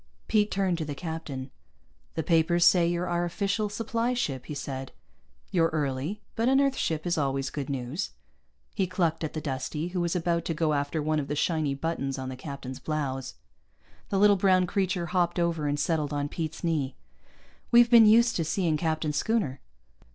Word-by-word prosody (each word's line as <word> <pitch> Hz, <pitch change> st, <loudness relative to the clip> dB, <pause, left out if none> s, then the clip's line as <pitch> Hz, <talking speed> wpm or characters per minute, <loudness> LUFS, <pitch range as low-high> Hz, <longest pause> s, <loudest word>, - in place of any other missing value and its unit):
Pete 210 Hz, -1 st, +3 dB
turned 190 Hz, -3 st, 0 dB
to -, -, -1 dB
the 145 Hz, -2 st, -5 dB
captain. 145 Hz, -5 st, -5 dB, 0.6 s
"The 160 Hz, -, -1 dB
papers 170 Hz, +2 st, +3 dB
say 175 Hz, -1 st, +5 dB
you're 175 Hz, +1 st, -1 dB
our 175 Hz, 0 st, 0 dB
official 200 Hz, +4 st, -1 dB
supply 230 Hz, +3 st, -1 dB
ship," 140 Hz, -, -2 dB
he 150 Hz, -, -5 dB
said. 135 Hz, -1 st, -5 dB, 0.6 s
"You're 165 Hz, -4 st, +3 dB
early, 150 Hz, +6 st, -2 dB
but 230 Hz, +2 st, +2 dB
an 270 Hz, +1 st, +4 dB
Earth 275 Hz, -1 st, +2 dB
ship 160 Hz, -7 st, -1 dB
is 175 Hz, -2 st, 0 dB
always 135 Hz, -1 st, -1 dB
good 145 Hz, -2 st, -4 dB
news." 135 Hz, +7 st, -3 dB, 0.6 s
He 190 Hz, -3 st, 0 dB
clucked 170 Hz, -3 st, 0 dB
at 155 Hz, -, -3 dB
the 155 Hz, -, -3 dB
Dustie, 150 Hz, +4 st, -3 dB
who 180 Hz, 0 st, -2 dB
was 170 Hz, 0 st, 0 dB
about 170 Hz, -1 st, 0 dB
to 165 Hz, -, -2 dB
go 155 Hz, -1 st, +1 dB
after 145 Hz, +2 st, -1 dB
one 155 Hz, 0 st, +1 dB
of 140 Hz, -, -3 dB
the 145 Hz, -, -2 dB
shiny 155 Hz, -2 st, 0 dB
buttons 140 Hz, -3 st, -2 dB
on 130 Hz, -1 st, -4 dB
the 130 Hz, -, -5 dB
captain's 130 Hz, -1 st, -7 dB
blouse. 135 Hz, -4 st, -3 dB, 0.7 s
The 195 Hz, -, 0 dB
little 205 Hz, 0 st, +6 dB
brown 185 Hz, -1 st, +4 dB
creature 185 Hz, -1 st, -1 dB
hopped 175 Hz, 0 st, 0 dB
over 170 Hz, -3 st, 0 dB
and 145 Hz, 0 st, 0 dB
settled 155 Hz, -3 st, 0 dB
on 145 Hz, 0 st, -1 dB
Pete's 160 Hz, +1 st, -5 dB
knee. 150 Hz, -6 st, 0 dB, 0.7 s
"We've 240 Hz, 0 st, +6 dB
been 230 Hz, -2 st, +9 dB
used 235 Hz, +2 st, +5 dB
to 165 Hz, -, +1 dB
seeing 160 Hz, 0 st, 0 dB
Captain 155 Hz, -1 st, -1 dB
Schooner." 150 Hz, -, 0 dB
165 Hz, 190 wpm, -28 LUFS, 145-185 Hz, 0.7 s, been